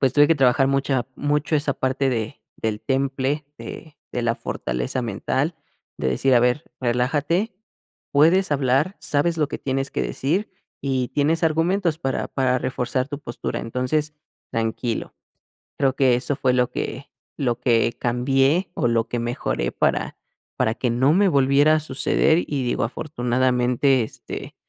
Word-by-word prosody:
Pues 130 -2 +3
tuve 145 +1 +6
que 165 - +5
trabajar 135 -1 +3
mucha 135 -2 0
mucho 150 +2 0
esa 145 -2 0
parte 130 +1 0
de 115 -4 -3 0.2
del 110 -1 -2
temple 135 +2 -1
de 155 -2 -9 0.2
de 125 - -2
la 115 -1 +1
fortaleza 60 - -3
mental, 130 - -1 0.4
de - - 0
decir: 130 - +2
"A 120 - +6
ver 125 +6 +1 0.2
relájate, 145 - 0 0.6
puedes 165 +6 +4
hablar, 140 +6 +1
sabes 165 +4 0
lo 150 -2 +1
que - - -5
tienes 135 0 -2
que - - -2
decir, 180 +11 -1 0.3
y 130 -2 -1
tienes 155 +4 +1
argumentos 165 +1 +1
para 135 -5 -2
para 130 -2 +1
reforzar 130 +1 -2
tu 145 -1 -5
postura. 120 -4 -4
Entonces, 130 +6 -1 0.4
tranquilo", 115 +1 -2 0.6
creo 135 -1 +2
que 130 -3 +4
eso 130 +3 -1
fue 130 -3 +1
lo 125 0 +2
que 140 +2 -5 0.3
lo 125 -5 0
que 115 -2 +2
cambié, 135 +8 +2
o, - - +1
lo 115 -1 +1
que 120 - -2
mejoré 115 - -2
para - - 0 0.4
para 110 - +2
que 125 +1 -1
no 130 +5 +3
me 200 +3 +4
volviera 140 0 +4
a - - +2
suceder, 155 +3 +2
y 140 -3 -2
digo 120 - 0
afortunadamente, 125 -1 +1
este, 110 - -8
135 Hz, 155 wpm, -23 LUFS, 125-150 Hz, 0.6 s, tuve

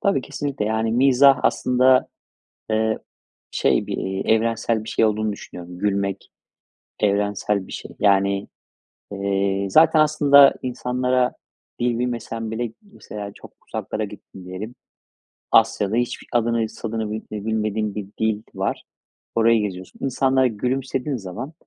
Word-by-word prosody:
Tabii 200 -8 +2
kesinlikle 140 -3 -4
yani 110 +1 0
mizah 135 +2 +5
aslında, 130 +1 +3 0.6
eee, 110 0 +1 0.5
şey - - +1
bir, - - -3
iii, 95 0 -3
evrensel 115 0 +1
bir 110 - -7
şey 115 - +2
olduğunu 110 0 0
düşünüyorum. 90 -3 -9
Gülmek 100 -1 -1 0.7
evrensel 105 -1 0
bir - - -11
şey. - - -8
Yani, 100 -1 +2 0.6
eee, 100 0 0
zaten 160 - +6
aslında 145 -2 +6
insanlara 125 0 0 0.5
dil 120 -1 +1
bilmesen 115 -2 -3
bile 115 0 -3
mesela 105 - -9
çok - - -14 0.2
uzaklara - - -3
gittin 95 - -11
diyelim. 105 +6 -7 0.8
Asya'da 110 -1 +3
hiç 120 0 -1
b - - -16
adını, 115 -1 +1
sanını 110 -1 -4
bi 110 - -4 0.2
bilmediğim 110 -1 -1
bir 105 -2 -5
dil 110 -1 +1
var. - - -2 0.5
Orayı 115 0 +4
geziyorsun. 95 -2 -6
İnsanlara 130 0 +2
gülümsediğin 130 +4 -2
zaman 100 - -7
110 Hz, 125 wpm, -22 LUFS, 105-125 Hz, 0.8 s, zaten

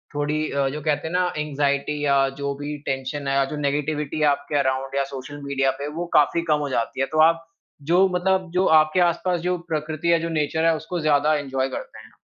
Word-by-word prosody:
थोड़ी 150 +1 -1
अ, 140 -1 +1
जो 150 +2 -5
कहते 150 +1 -1
है 170 - -6
ना 180 0 +2
ऐंगज़ाइटी 145 0 -1
या 140 -1 +3 0.2
जो 140 0 -1
भी 150 +1 -4
टेंशन 135 +2 -3
है 135 0 +2
जो 150 - -5
नेगेटिविटी 150 +1 -2
है 150 - +3
आपके 145 +1 0
अराउंड 135 0 -1
या 140 - +2
सोशल 145 +2 -7
मीडिया 135 -1 +1
पे 145 - -3
वो 175 - -2
काफ़ी 170 +3 +2
कम 150 - +3
हो - - -5
जाती 130 +1 -2
है, - - +3
तो 155 - -2
आप 165 +1 +3 0.5
जो 190 +2 +5
मतलब 185 0 +1
जो 185 +1 +2 0.2
आपके 155 +4 0
आस 170 -1 +2
पास 180 -1 +1
जो 180 0 0
प्रकृति 155 +1 -3
है 170 -1 +4
जो 165 - -3
नेचर 160 +1 0
है 165 -1 +4
उसको 165 +3 -5
ज़्यादा 150 0 +3
इन्जॉय 135 0 -1
करते - - -7
हैं। - - -20
150 Hz, 225 wpm, -23 LUFS, 140-165 Hz, 0.5 s, जो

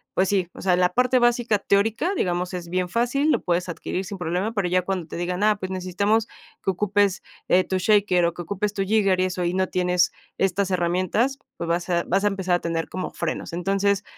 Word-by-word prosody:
pues 190 - +3
sí, 190 -4 +1
o - - -9
sea, 185 -2 +3
la 180 0 +2
parte 250 +1 +3
básica 240 -3 +2
teórica, 225 - +1
digamos, 180 - -1
es 175 -1 -6
bien 180 0 -1
fácil, 245 - +1
lo - - +1
puedes 175 0 0
adquirir 185 +2 -4
sin 195 +1 -6
problema, 180 +5 -2
pero 200 -5 0
ya 185 0 +2
cuando 185 -1 -3
te - - -7
digan: 180 +3 -2
"Ah, 215 0 +4
pues 185 - -4
necesitamos 200 +4 0 0.4
que 190 - +2
ocupes, 200 0 +1 0.3
eh, 185 +1 +4
tu 190 - -3
shaker 190 -3 +3
o 170 - 0
que 175 - -7
ocupes 200 +3 -2
tu 195 - -2
jigger 195 -2 +2
y 185 - +3
eso", 185 -1 -2
y 175 0 0
no 185 0 +1
tienes 180 -1 +2 0.3
estas 195 0 +1
herramientas, 185 +9 +1 0.2
pues, 170 - -4
vas 170 +2 -1
a 170 -1 +1
vas 195 +3 +1
a - - +4
empezar 190 -3 0
a 175 - 0
tener 165 -1 -2
como 185 - -4
frenos. 165 0 -4
Entonces, 195 +3 +1
185 Hz, 225 wpm, -24 LUFS, 180-205 Hz, 0.4 s, Ah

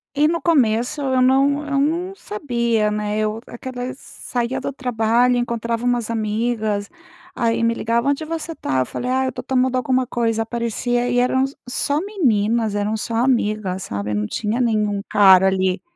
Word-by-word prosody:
E 295 +2 +4
no 335 +1 0
começo 265 -3 +1
eu 260 -2 +1
não 275 +3 +3
eu 280 -1 0
não 345 +6 -1
sabia, 235 - -1
né, 210 0 -2
eu 215 0 -1
aquela 250 +1 -6
saia 245 -2 -4
do - - -3
trabalho, 245 -1 +1
encontrava 235 0 -2
umas 240 -2 0
amigas, 215 -2 -1 0.5
aí 230 0 0
me 230 0 +3
ligava: 235 +3 0
"Onde 285 +2 0
você 320 0 -4
está?" 130 - -1
Eu - - 0
falei: 250 - -4
"Ah, 260 +1 +1
eu - - 0
estou - - -7
tomando 260 -1 +1
alguma 255 0 +1
coisa", 225 -2 0
aparecia 240 +1 -1
e 245 - 0
eram 255 +2 +2 0.2
só 285 +4 0
meninas, 230 - +1
eram 205 +1 0
só 225 +1 -4
amigas, 215 -6 0
sabe. 100 +1 -4
Não 105 0 -1
tinha 220 - -2
nenhum 210 -4 +1
cara 190 -2 +6
ali. 190 -1 0
235 Hz, 170 wpm, -21 LUFS, 215-260 Hz, 0.5 s, cara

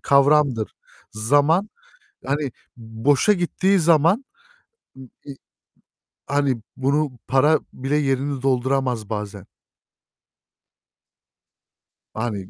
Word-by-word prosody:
kavramdır. 140 -5 +3 0.4
Zaman, 145 - +2 0.6
hani, 145 -2 -2 0.2
boşa 120 - +1
gittiği 190 +1 +1
zaman, 170 - +3 0.7
ııı, 130 -1 -12 0.2
iii, 140 -2 -9 0.9
hani, 140 -4 0
bunu 140 0 -1
para 145 +4 +3
bile 135 +3 -2
yerini 135 -1 -1
dolduramaz 130 -4 0
bazen. 105 -3 -5 2.7
Hani, 105 -4 -4
135 Hz, 75 wpm, -22 LUFS, 120-150 Hz, 2.7 s, kavramdır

